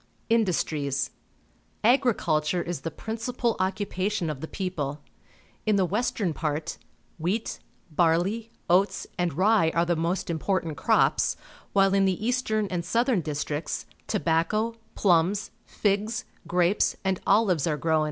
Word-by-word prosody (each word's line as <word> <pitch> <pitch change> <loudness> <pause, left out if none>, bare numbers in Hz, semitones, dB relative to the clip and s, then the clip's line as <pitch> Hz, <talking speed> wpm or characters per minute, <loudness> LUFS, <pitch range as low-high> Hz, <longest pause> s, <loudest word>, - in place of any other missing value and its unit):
Industries. 150 - +1 0.3
— - - -38
Agriculture 185 - +2
is 170 -5 -4
the 165 - -3
principal 230 +6 -2
occupation 190 -1 -1
of 140 -3 -7
the 160 - -4
people. 155 -7 -3 0.7
In 215 - +4
the 195 -2 +3
western 205 -2 0
part, 155 +1 -3 0.4
wheat, 190 +8 -2 0.3
barley, 175 +8 +1 0.2
oats, 185 +4 +2
and 175 -3 +1
rye 190 +1 +4
are 170 +1 +3
the 175 0 +1
most 170 +2 -1
important 170 -1 -1
crops, - - +2 0.4
while 195 -1 +4
in 195 0 +4
the 190 +3 0
eastern 230 -3 +1
and 175 -2 -1
southern 230 +3 +2
districts, 150 0 -3 0.2
tobacco, 170 +9 +1 0.2
plums, 190 +2 +2 0.2
figs, 215 +4 0 0.2
grapes, 175 +3 +2
and 190 -1 0
olives 195 -7 +3
are 150 -2 0
grown. 160 +2 +2
185 Hz, 130 wpm, -27 LUFS, 160-215 Hz, 0.7 s, In